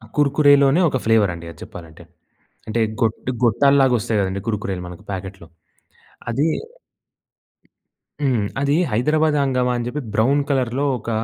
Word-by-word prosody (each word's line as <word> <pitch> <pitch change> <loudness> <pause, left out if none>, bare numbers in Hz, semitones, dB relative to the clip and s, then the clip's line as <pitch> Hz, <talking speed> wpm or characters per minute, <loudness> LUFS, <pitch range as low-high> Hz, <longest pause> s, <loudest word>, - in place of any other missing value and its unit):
కుర్కురేలోనే 145 +1 +4
ఒక 135 - -1
ఫ్లేవర్ 110 -4 +3
అండి 85 0 -9
అది 80 - -16
చెప్పాలంటే. 85 0 -12 0.6
అంటే 110 +2 -1 0.2
గోటూ 115 +2 -1
గొట్టాల 140 +5 +3
లాగా 130 -2 +3
వస్తాయి 110 -1 -1
కదండీ! 95 0 -2
కుర్కురేలు 100 -4 -3
మనకు 90 -1 -11
ప్యాకెట్‌లో 95 -2 -7 0.8
అదీ. 140 +7 +1 1.7
హ్మ్, 130 -6 +1 0.2
అది 140 0 +1 0.2
హైదరాబాద్ 150 +7 +1
హంగామా 125 -2 +1
అని 120 - -3
చెప్పి, 150 +4 -4
బ్రౌన్ 125 +6 +2
కలర్‌లో 130 0 0
ఒక 115 - -8
120 Hz, 135 wpm, -20 LUFS, 100-140 Hz, 1.7 s, కుర్కురేలోనే